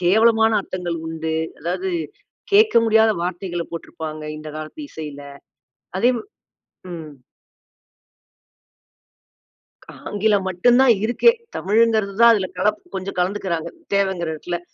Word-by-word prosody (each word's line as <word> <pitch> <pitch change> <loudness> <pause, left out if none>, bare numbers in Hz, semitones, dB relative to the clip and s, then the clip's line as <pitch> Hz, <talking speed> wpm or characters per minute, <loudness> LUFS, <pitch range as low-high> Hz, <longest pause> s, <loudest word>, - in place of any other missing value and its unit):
கேவலமான 220 +4 +4
அர்த்தங்கள் 175 -3 -4
உண்டு. 160 0 -3 0.3
அதாவது 180 +4 -2 0.6
கேக்க 430 - +5
முடியாத 220 0 +5
வார்த்தைகள 175 -1 -3
போட்டுருப்பாங்க 155 -2 -6
இந்த 155 0 -8
காலத்து 155 - -8
இசைல. 150 -2 -8 0.8
அதே 240 +6 +4 0.8
ம். 160 -3 -8 3.0
ஆங்கிலம் 205 -1 +1
மட்டும்தான் 245 +7 +5
இருக்கே. 240 - +4 0.2
தமிழ்ங்கிறதுதான் 220 +1 +3
அதுல 190 -3 0
கலப்பு, 210 +3 0
கொஞ்சம் 190 0 -5
கலந்துக்குறாங்க, 180 -3 -1 0.2
தேவைங்கிற 190 -4 0
எடத்துல. 175 +3 -4
190 Hz, 95 wpm, -21 LUFS, 170-220 Hz, 3.0 s, கேக்க